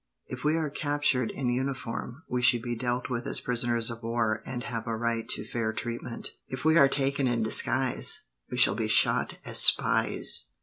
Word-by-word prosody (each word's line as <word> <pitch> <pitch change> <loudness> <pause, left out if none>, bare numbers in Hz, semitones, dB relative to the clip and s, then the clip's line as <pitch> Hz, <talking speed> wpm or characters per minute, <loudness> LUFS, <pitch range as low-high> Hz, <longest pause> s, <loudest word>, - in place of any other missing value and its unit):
If - - -9
we 155 +2 +1
are 155 -3 -3
captured 145 -5 0
in 130 -3 -3
uniform, 130 +1 -5
we 125 0 -2
should 120 -1 +3
be 120 -1 -4
dealt 120 +1 -3
with 125 -2 -4
as - - -2
prisoners 120 -1 -1
of 115 0 -9
war 115 -2 -2
and 120 -1 -5
have 115 0 -6
a 115 - -2
right 115 0 -3
to - - -1
fair 115 -2 -3
treatment. 120 +1 -6 0.2
If 130 +2 -8
we 160 0 +4
are 140 -4 +5
taken 140 -1 -1
in 120 -2 -1
disguise, 125 +3 +3 0.3
we 125 - -6
shall 125 -5 +6
be 110 +1 -3
shot 110 - +2
as - - +1
spies." - - +4
120 Hz, 190 wpm, -27 LUFS, 115-130 Hz, 0.3 s, shall